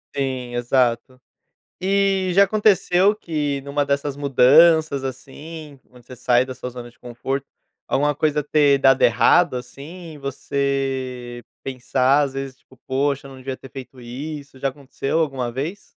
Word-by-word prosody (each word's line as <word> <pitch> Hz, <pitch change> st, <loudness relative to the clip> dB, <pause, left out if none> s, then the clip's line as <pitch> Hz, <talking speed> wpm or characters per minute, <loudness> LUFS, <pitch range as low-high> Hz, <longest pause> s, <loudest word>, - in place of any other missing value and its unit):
Sim, 130 Hz, -3 st, -3 dB
exato. 125 Hz, 0 st, 0 dB, 0.6 s
E 195 Hz, -1 st, +1 dB
já 200 Hz, +2 st, +7 dB
aconteceu 200 Hz, -1 st, +3 dB
que 150 Hz, -8 st, -3 dB
numa 140 Hz, +1 st, -1 dB
dessas 140 Hz, 0 st, -1 dB
mudanças, 145 Hz, +2 st, +5 dB
assim, 145 Hz, +3 st, -8 dB
onde 125 Hz, -1 st, -19 dB
você 125 Hz, -, -11 dB
sai 125 Hz, +1 st, +2 dB
da 130 Hz, -, -6 dB
sua 125 Hz, -, -7 dB
zona 120 Hz, -1 st, -9 dB
de -, -, -31 dB
conforto, 130 Hz, +3 st, -4 dB, 0.4 s
alguma 145 Hz, +2 st, +1 dB
coisa 150 Hz, 0 st, 0 dB
ter 145 Hz, -1 st, +3 dB
dado 135 Hz, -1 st, +4 dB
errado, 150 Hz, +6 st, +4 dB
assim, 155 Hz, +7 st, -9 dB
e -, -, -11 dB
você 135 Hz, -3 st, -3 dB, 0.2 s
pensar, 130 Hz, +2 st, +1 dB
às 135 Hz, -1 st, -3 dB
vezes, 135 Hz, -1 st, -6 dB
tipo: 130 Hz, -, -23 dB
"Poxa, 140 Hz, +1 st, -1 dB
eu -, -, -12 dB
não 130 Hz, -, -11 dB
devia 130 Hz, 0 st, -6 dB
ter 135 Hz, -, -13 dB
feito 130 Hz, -1 st, -10 dB
isso", 135 Hz, +3 st, -8 dB
já 135 Hz, -, 0 dB
aconteceu 135 Hz, +2 st, -3 dB
alguma 135 Hz, -6 st, -1 dB
vez? 150 Hz, -, -5 dB
135 Hz, 155 wpm, -21 LUFS, 130-150 Hz, 0.6 s, já